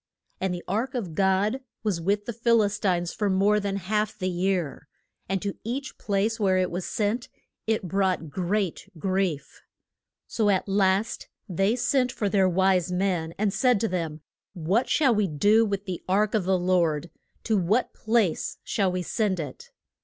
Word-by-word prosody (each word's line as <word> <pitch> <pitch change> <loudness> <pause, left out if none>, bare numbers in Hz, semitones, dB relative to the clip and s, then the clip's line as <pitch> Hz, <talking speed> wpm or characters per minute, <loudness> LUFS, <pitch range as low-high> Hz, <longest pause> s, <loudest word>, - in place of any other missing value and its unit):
And 190 -1 -1
the 175 -1 -4
ark 235 +7 -1
of 195 -10 -3
God 195 +7 +2 0.2
was 200 -6 -1
with 205 +4 0
the 235 - -4
Phil 230 0 +3
is 205 +1 -1
tines 175 -4 0
for 205 -2 0
more 200 +2 +3
than 200 -1 -2
half 210 +2 -1
the 185 -2 -1
year, 180 -4 -1 0.4
and 195 0 0
to 200 -1 -3
each 260 +4 -5
place 210 +3 0
where 190 -3 +3
it 185 -1 +1
was 180 +1 -3
sent 230 +4 -1 0.4
it 215 -4 0
brought 185 -4 0
great 190 +2 -2
grief. 185 -4 -2 0.6
So 215 -3 0
at 190 0 +1
last 195 +2 +1 0.2
they 195 +4 +1
sent 255 0 +1
for 205 -4 -1
their 190 -1 +3
wise 185 -1 +2
men, 180 -3 -1
and 205 -1 0
said 250 -5 +3
to 225 - +2
them, 165 -5 -3 0.3
What 190 +8 0
shall 280 -5 +4
we 210 -2 +2
do 205 +9 +3
with 200 0 -3
the 185 -4 -4
ark 205 +2 +2
of 210 -5 +1
the 190 0 +3
Lord? 175 -3 +1 0.3
To 220 - +1
what 205 +6 +1
place 220 -6 0
shall 195 -6 0
we 180 0 -2
send 195 0 0
it? 145 -5 -7
195 Hz, 175 wpm, -26 LUFS, 180-215 Hz, 0.6 s, shall